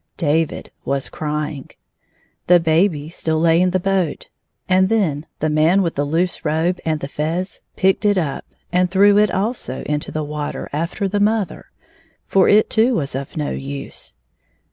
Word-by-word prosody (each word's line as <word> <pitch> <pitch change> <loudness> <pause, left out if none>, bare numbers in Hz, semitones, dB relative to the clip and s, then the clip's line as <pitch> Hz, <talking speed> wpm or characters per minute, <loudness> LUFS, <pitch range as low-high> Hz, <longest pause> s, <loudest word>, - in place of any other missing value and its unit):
David 160 0 0
was 135 -1 -1
crying. 150 -2 -4 0.8
The 180 0 +7
baby 160 -2 +1
still 160 -2 -1
lay 165 +1 +4
in 185 - +3
the 185 +1 +1
boat, 185 -4 -1 0.4
and 185 0 +3
then 165 -10 0
the 155 - +2
man 160 +6 +3
with 170 - -1
the 145 - -1
loose 170 +5 -1
robe 160 +4 0
and 155 -2 -1
the 140 - -3
fez 165 +6 -3
picked 190 +2 +2
it 205 -1 +3
up, 150 -6 -2 0.3
and 180 0 +2
threw 200 +2 +5
it 210 -1 +4
also 200 - -2
into 150 0 -3
the 155 - -2
water 150 0 -4
after 170 +6 -2
the 205 +2 -1
mother, 210 -1 0 0.6
for 190 -1 +3
it 210 +1 +5
too 230 +3 +3
was 140 -7 -2
of 135 +4 -5
no 150 -1 -1
use. 140 - -6
165 Hz, 165 wpm, -20 LUFS, 150-190 Hz, 0.8 s, The